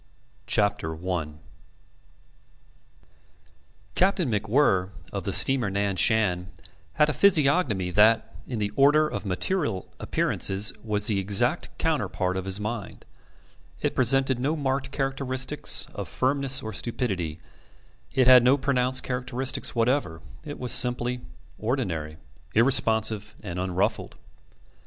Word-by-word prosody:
TYPHOON 85 Hz, -5 st, -1 dB
I -, -, -32 dB, 0.9 s
Captain 185 Hz, -7 st, +1 dB
MacWhirr, 105 Hz, -3 st, +1 dB, 0.2 s
of -, -, -4 dB
the -, -, -1 dB
steamer 130 Hz, -6 st, +4 dB
Nan 100 Hz, 0 st, -1 dB
Shan, 95 Hz, -4 st, +2 dB, 0.4 s
had 150 Hz, 0 st, +3 dB
a 155 Hz, -, -1 dB
physiognomy 145 Hz, -, +2 dB
that, 110 Hz, +4 st, +3 dB
in 120 Hz, -, -4 dB
the 105 Hz, -1 st, -2 dB
order 150 Hz, +3 st, +4 dB
of 110 Hz, -, -6 dB
material 110 Hz, -, -2 dB
appearances, 100 Hz, +2 st, +1 dB
was 105 Hz, -2 st, -1 dB
the 105 Hz, -2 st, +1 dB
exact 95 Hz, +1 st, 0 dB
counterpart 90 Hz, 0 st, -1 dB
of 95 Hz, 0 st, -4 dB
his 95 Hz, +1 st, +1 dB
mind: 105 Hz, 0 st, -6 dB, 0.8 s
it -, -, 0 dB
presented 130 Hz, 0 st, +3 dB
no 145 Hz, +5 st, 0 dB
marked 135 Hz, -2 st, -2 dB
characteristics 135 Hz, -2 st, -1 dB
of -, -, -6 dB
firmness 135 Hz, 0 st, 0 dB
or 110 Hz, 0 st, -6 dB
stupidity; 95 Hz, -, -3 dB, 0.7 s
it 130 Hz, -, +2 dB
had 125 Hz, 0 st, +8 dB
no 130 Hz, +3 st, +4 dB
pronounced 130 Hz, -2 st, 0 dB
characteristics 125 Hz, 0 st, -3 dB
whatever; 115 Hz, -, 0 dB, 0.2 s
it -, -, -7 dB
was 125 Hz, -1 st, -2 dB
simply 125 Hz, 0 st, +1 dB, 0.4 s
ordinary, 90 Hz, -, -3 dB, 0.4 s
irresponsive, 110 Hz, -3 st, +1 dB
and 90 Hz, -3 st, -5 dB
unruffled. 95 Hz, +2 st, -2 dB
115 Hz, 115 wpm, -25 LUFS, 95-130 Hz, 0.9 s, had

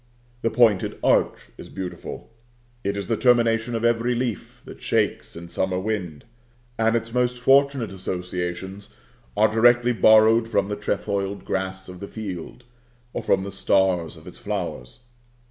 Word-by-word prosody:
The 115 Hz, -, +1 dB
pointed 110 Hz, -4 st, +3 dB
arch -, -, +1 dB
is -, -, -10 dB
beautiful; 90 Hz, +3 st, -7 dB, 0.5 s
it 100 Hz, 0 st, -1 dB
is 100 Hz, -, -3 dB
the -, -, 0 dB
termination 115 Hz, -2 st, +2 dB
of 115 Hz, +1 st, -1 dB
every 120 Hz, +1 st, +2 dB
leaf 120 Hz, -2 st, -4 dB
that -, -, -11 dB
shakes -, -, -1 dB
in 85 Hz, +1 st, -8 dB
summer 90 Hz, +2 st, -1 dB
wind, 95 Hz, -7 st, -4 dB, 0.5 s
and 115 Hz, +1 st, +3 dB
its 115 Hz, 0 st, -2 dB
most 125 Hz, 0 st, +1 dB
fortunate 135 Hz, -3 st, +3 dB
associations 90 Hz, +1 st, -5 dB, 0.4 s
are 110 Hz, +1 st, +5 dB
directly 120 Hz, +2 st, +4 dB
borrowed 110 Hz, 0 st, +5 dB
from 100 Hz, -3 st, 0 dB
the 105 Hz, -, -2 dB
trefoiled 100 Hz, -1 st, -3 dB
grass 95 Hz, 0 st, -3 dB
of 90 Hz, -1 st, -10 dB
the 100 Hz, -, -7 dB
field, 100 Hz, +1 st, -7 dB, 0.5 s
or -, -, -3 dB
from 95 Hz, -, +1 dB
the 100 Hz, -, -6 dB
stars 95 Hz, -4 st, +1 dB
of -, -, -15 dB
its -, -, -11 dB
flowers. 60 Hz, -, -5 dB
105 Hz, 150 wpm, -23 LUFS, 95-115 Hz, 0.5 s, are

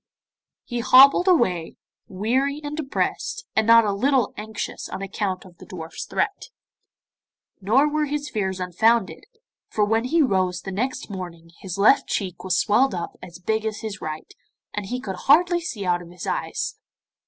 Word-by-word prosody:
He 240 Hz, -1 st, -4 dB
hobbled 275 Hz, +9 st, +7 dB
away, 185 Hz, -, +2 dB, 0.3 s
weary 260 Hz, +9 st, 0 dB
and 295 Hz, 0 st, -4 dB
depressed, 315 Hz, +8 st, -2 dB
and 220 Hz, 0 st, +2 dB
not 230 Hz, 0 st, +7 dB
a 205 Hz, -, 0 dB
little 255 Hz, +2 st, +1 dB
anxious 220 Hz, 0 st, -6 dB
on 195 Hz, -, -5 dB
account 195 Hz, -1 st, -3 dB
of 175 Hz, -2 st, -17 dB
the -, -, -12 dB
dwarfs' 165 Hz, -3 st, -7 dB
threat. -, -, -2 dB, 1.2 s
Nor 245 Hz, +10 st, +3 dB
were 300 Hz, 0 st, 0 dB
his 295 Hz, 0 st, -3 dB
fears 190 Hz, -6 st, -2 dB
unfounded, 195 Hz, -, +1 dB, 0.5 s
for 210 Hz, -, +1 dB
when 225 Hz, +3 st, +1 dB
he 320 Hz, +5 st, +3 dB
rose 185 Hz, -6 st, 0 dB
next 230 Hz, +5 st, -3 dB
morning 170 Hz, -3 st, -8 dB
his 185 Hz, -2 st, -6 dB
left 210 Hz, +7 st, +4 dB
cheek 185 Hz, -4 st, -3 dB
was 185 Hz, -1 st, +1 dB
swelled 225 Hz, +1 st, +3 dB
up 170 Hz, -, -5 dB
as 175 Hz, -2 st, -10 dB
big 220 Hz, +5 st, -1 dB
as 220 Hz, -1 st, -3 dB
his 215 Hz, -3 st, -6 dB
right, 155 Hz, 0 st, -6 dB, 0.4 s
and 205 Hz, -2 st, -4 dB
he 250 Hz, +4 st, -3 dB
could 195 Hz, -7 st, -5 dB
hardly 345 Hz, +4 st, +5 dB
see 230 Hz, -, -5 dB
out 175 Hz, -1 st, +1 dB
of 170 Hz, -, -12 dB
his 180 Hz, +1 st, -9 dB
eyes. -, -, -3 dB
210 Hz, 165 wpm, -23 LUFS, 185-265 Hz, 1.2 s, hobbled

